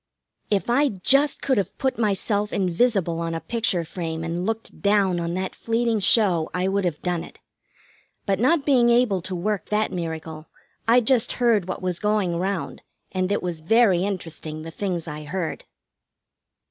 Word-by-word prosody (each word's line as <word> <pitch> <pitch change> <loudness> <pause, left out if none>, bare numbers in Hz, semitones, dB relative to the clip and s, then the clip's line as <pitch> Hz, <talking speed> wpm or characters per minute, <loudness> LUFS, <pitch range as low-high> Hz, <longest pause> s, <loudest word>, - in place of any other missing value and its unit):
If 200 -2 0
I 275 +4 +3
just 275 +9 +1
could 260 -5 +2
have 195 - -4
put 265 -3 -1
myself 210 -1 0
invisible 185 -2 +1
on 165 0 -2
a - - -2
picture 195 -5 -1
frame 165 -1 -4
and 170 +3 -3
looked 225 0 -4
down 200 -3 +2
on 170 0 -2
that 185 0 -3
fleeting 230 -1 0
show 190 -6 +4
I 180 +1 0
would 195 0 0
have 165 -4 -3
done 175 -2 -1
it. - - -13 0.9
But 195 -1 0
not 280 +5 +2
being 250 -4 +4
able 235 -6 +3
to 185 +2 -5
work 200 +3 -2
that 210 +1 +1
miracle, 160 -2 -5 0.4
I 240 +2 +6
just 245 0 +2
heard 230 -7 +2
what 185 - -5
was 180 -2 -2
going 210 -5 0
round, 190 +1 -3 0.3
and 185 0 -1
it 205 - 0
was 175 -3 -3
very 190 +1 +3
interesting, 165 -5 -5
the 165 - -7
things 175 -2 -3
I 150 0 -6
heard. 170 +2 -4
190 Hz, 170 wpm, -24 LUFS, 170-225 Hz, 0.9 s, I